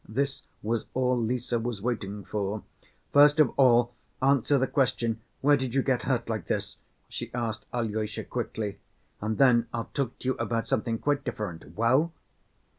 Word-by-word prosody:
This 135 +4 -1 0.2
was 110 +1 -1
all 125 0 +2
Lise 120 +1 -1
was 120 -2 -1
waiting 105 -3 -3
for. 105 0 -2 0.5
"First 145 +1 +7
of 150 -5 +6
all, 120 -2 +5 0.3
answer 140 +1 +3
the 130 - +2
question, 120 -5 0 0.2
where 145 +1 +6
did 130 -2 -3
you 135 - +3
get 130 -3 +1
hurt 125 -3 0
like 110 -7 -3
this?" - - -2 0.3
she - - -6
asked 115 -3 -3
Alyosha, 110 -3 -2
quickly. 100 -2 -4 0.4
"And 110 +1 -1
then 120 -4 +5
I'll 115 -1 -4
talk 135 -4 -2
to 130 - -3
you - - +3
about 115 0 -1
something 115 -3 0
quite 145 +3 0
different. 85 - -5
Well?" 130 +9 +3
120 Hz, 165 wpm, -28 LUFS, 110-130 Hz, 0.5 s, First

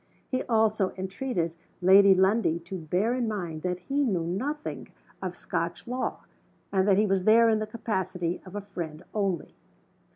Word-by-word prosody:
He 255 -1 -1
also 220 -4 +2
entreated 190 -2 -2 0.3
Lady 195 +2 +7
Lundie 190 -2 +3
to 175 +3 -7
bear 180 +7 0
in 250 -2 0
mind 175 -7 -4
that 180 +1 -1
he 280 +10 0
knew 190 -10 0
nothing 270 - -3 0.3
of - - -4
Scotch - - -3
law, 250 +1 -3 0.5
and 190 0 +2
that 195 -2 +5
he 210 - +4
was 195 -2 +1
there 230 +2 +6
in 220 -1 +3
the 215 - -3
capacity 190 -6 -2
of 185 +1 -11
a 205 - -3
friend 175 -5 -7
only. 195 -6 -1
195 Hz, 165 wpm, -27 LUFS, 180-225 Hz, 0.5 s, Lady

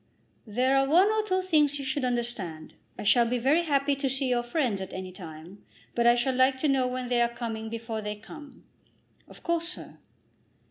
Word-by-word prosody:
"There 250 +5 +1
are 270 0 +3
one 355 +8 +5
or 435 0 +2
two 375 -1 +1
things 300 -5 +3
you 275 - -5
should 265 +1 -1
understand. 235 -10 -3 0.2
I - - -5
shall 235 +3 +4
be 250 +2 0
very 275 +8 +3
happy 285 -3 +1
to 275 -1 -1
see 270 +1 0
your 245 -1 +2
friends 240 -5 -1
at 190 - -6
any 185 0 -6
time, 175 +1 -11 0.3
but 235 0 +2
I 240 - +7
shall 245 +2 0
like 260 +1 +3
to 305 - +2
know 265 -2 +2
when 250 0 -3
they 245 -1 +2
are 235 - +3
coming 225 -2 -5
before 225 -1 -4
they 210 0 -4
come." 285 +7 -13 0.6
"Of - - -16
course, 340 0 0
sir." 360 - -8
250 Hz, 205 wpm, -27 LUFS, 225-280 Hz, 0.6 s, I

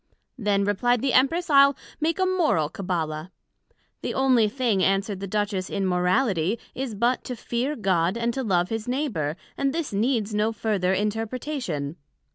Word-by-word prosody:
Then, 200 -2 +1
replied 235 +4 +1
the 270 - +1
Empress, 330 +7 +3
I'le 280 -2 +6 0.2
make 320 +2 0
a 375 - +2
Moral 330 - +2
Cabbala. 165 -3 -3 0.7
The - - -3
onely 255 -5 +4
thing, 230 -5 0
answered 195 +1 +1
the 195 - -5
Duchess, 200 -2 -1
in 195 - -1
Morality, 185 +1 +1 0.2
is 255 -4 -4
but, 240 +5 +1
To 250 - -4
fear 245 +5 -2
God, 185 - +1
and 235 0 0
to 265 - -2
love 180 -6 +1
his 225 0 -3
Neighbour, 245 - -1 0.2
and 275 -1 +1
this 330 -9 -3
needs 220 0 0
no 210 +2 +1
further 205 -4 0
interpretation. 210 - -2
215 Hz, 160 wpm, -25 LUFS, 190-255 Hz, 0.7 s, I'le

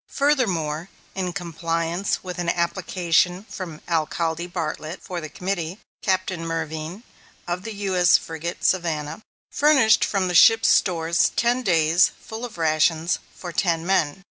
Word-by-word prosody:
Furthermore, 185 - 0 0.2
in 185 -2 -2
compliance 170 +1 -2
with 180 -1 -6
an 175 -1 -1
application 175 +1 0
from 180 -8 -8
Alcalde 165 +1 -1
Bartlett 165 -1 -4
(for 180 -2 -5
the 155 - -7
committee), 180 0 -3 0.2
Captain 185 -3 -1
Mervine, 165 +4 -4 0.4
of 175 +1 -2
the 220 +1 -7
U.S. 180 -2 +4
frigate 165 +1 -6
Savannah, 165 -3 0 0.3
furnished 280 -7 +4
from 195 -3 0
the 180 - -2
ship's 225 +5 +6
stores 170 -2 +2
ten 240 +2 +2
days' 165 -4 +3
full 225 +2 -7
rations 160 -2 +1
for 175 - -8
ten 165 -1 0
men. 185 -3 +1
175 Hz, 130 wpm, -23 LUFS, 165-190 Hz, 0.4 s, ship's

